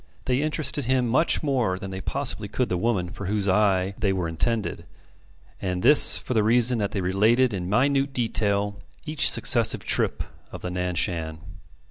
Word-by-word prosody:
They 130 Hz, +1 st, 0 dB
interested 150 Hz, -3 st, -2 dB
him 130 Hz, 0 st, +1 dB
much 130 Hz, +9 st, +1 dB
more 125 Hz, -10 st, 0 dB
than 95 Hz, 0 st, -8 dB
they 95 Hz, 0 st, -6 dB
possibly 125 Hz, -3 st, -3 dB
could 125 Hz, +4 st, -2 dB
the -, -, -1 dB
woman 90 Hz, -3 st, -1 dB
for 100 Hz, -, -7 dB
whose 105 Hz, 0 st, -1 dB
eye 95 Hz, -1 st, +1 dB
they 100 Hz, -3 st, 0 dB
were 90 Hz, -3 st, -2 dB
intended; 105 Hz, +7 st, -2 dB, 0.8 s
and 90 Hz, -1 st, -3 dB
this 150 Hz, -, +7 dB
for -, -, -5 dB
the 110 Hz, -, +2 dB
reason 120 Hz, +2 st, +3 dB
that 100 Hz, -1 st, -1 dB
they 100 Hz, -, -4 dB
related 110 Hz, +7 st, +2 dB
in 90 Hz, -2 st, -4 dB
minute 135 Hz, +5 st, +1 dB
detail 105 Hz, -4 st, -1 dB, 0.3 s
each 155 Hz, -3 st, +3 dB
successive -, -, +2 dB
trip -, -, 0 dB, 0.3 s
of -, -, -10 dB
the 90 Hz, -, -4 dB
Nan 90 Hz, 0 st, -3 dB
Shan. 80 Hz, -2 st, -2 dB
105 Hz, 175 wpm, -24 LUFS, 95-125 Hz, 0.8 s, this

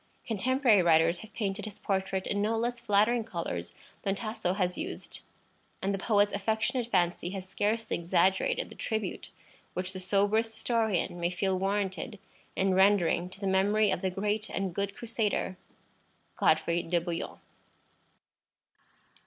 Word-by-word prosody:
Contemporary 240 Hz, -1 st, +3 dB
writers 165 Hz, 0 st, +4 dB
have 220 Hz, -, -11 dB
painted 205 Hz, -1 st, -2 dB
his 210 Hz, -2 st, -8 dB
portrait 190 Hz, -1 st, -1 dB
in 205 Hz, -, 0 dB
no 220 Hz, +2 st, +1 dB
less 240 Hz, +1 st, -1 dB
flattering 225 Hz, +1 st, +3 dB
colors 90 Hz, -, -4 dB, 0.3 s
than 195 Hz, 0 st, 0 dB
Tasso 215 Hz, -4 st, -2 dB
has 180 Hz, -2 st, 0 dB
used, 365 Hz, +4 st, -5 dB, 0.6 s
and 195 Hz, +1 st, -1 dB
the 195 Hz, -, -2 dB
poet's 205 Hz, 0 st, +3 dB
affectionate 220 Hz, +4 st, 0 dB
fancy 175 Hz, -3 st, +1 dB
has 190 Hz, 0 st, -6 dB
scarcely 210 Hz, +4 st, 0 dB
exaggerated 175 Hz, +2 st, +2 dB
the -, -, -11 dB
tribute 220 Hz, -4 st, -3 dB, 0.5 s
which 185 Hz, +1 st, -1 dB
the 185 Hz, -, -5 dB
soberest 205 Hz, +4 st, +2 dB
historian 220 Hz, -6 st, 0 dB
may 170 Hz, 0 st, +1 dB
feel 190 Hz, +1 st, 0 dB
warranted 195 Hz, +3 st, -1 dB, 0.4 s
in 190 Hz, 0 st, +2 dB
rendering 185 Hz, -2 st, +3 dB
to 190 Hz, -, -11 dB
the 200 Hz, -, -4 dB
memory 200 Hz, +2 st, +3 dB
of 180 Hz, -, -1 dB
the 190 Hz, -, +1 dB
great 205 Hz, +3 st, -1 dB
and 190 Hz, -2 st, -2 dB
good 200 Hz, +2 st, -2 dB
Crusader, 220 Hz, -5 st, -1 dB, 0.8 s
Godfrey 165 Hz, +2 st, +2 dB
de 170 Hz, +1 st, +1 dB
Bouillon. 170 Hz, 0 st, -4 dB
195 Hz, 145 wpm, -30 LUFS, 185-220 Hz, 0.8 s, writers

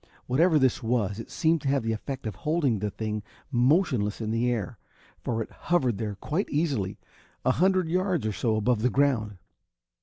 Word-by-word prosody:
Whatever 155 Hz, +6 st, +3 dB
this 130 Hz, -4 st, +2 dB
was 110 Hz, -3 st, 0 dB
it 115 Hz, -, -8 dB
seemed 160 Hz, -1 st, +1 dB
to 135 Hz, -, -4 dB
have 135 Hz, -2 st, +2 dB
the 115 Hz, -, 0 dB
effect 130 Hz, +4 st, -5 dB
of 110 Hz, -, -2 dB
holding 150 Hz, -, +1 dB
the 105 Hz, +1 st, -1 dB
thing 105 Hz, +1 st, -3 dB, 0.3 s
motionless 125 Hz, -, +2 dB
in 110 Hz, -1 st, -2 dB
the 115 Hz, +2 st, +1 dB
air, 115 Hz, -2 st, -3 dB, 0.4 s
for 115 Hz, -1 st, -1 dB
it -, -, -15 dB
hovered 130 Hz, -, 0 dB
there 105 Hz, -3 st, -3 dB
quite 155 Hz, -, -2 dB
easily, 140 Hz, -, -1 dB, 0.5 s
a 130 Hz, -, +5 dB
hundred 185 Hz, +4 st, +2 dB
yards 180 Hz, -, 0 dB
or 110 Hz, -, 0 dB
so 110 Hz, +1 st, 0 dB
above 110 Hz, +1 st, +1 dB
the 125 Hz, -, +3 dB
ground. 120 Hz, -7 st, +1 dB
125 Hz, 185 wpm, -27 LUFS, 110-150 Hz, 0.5 s, a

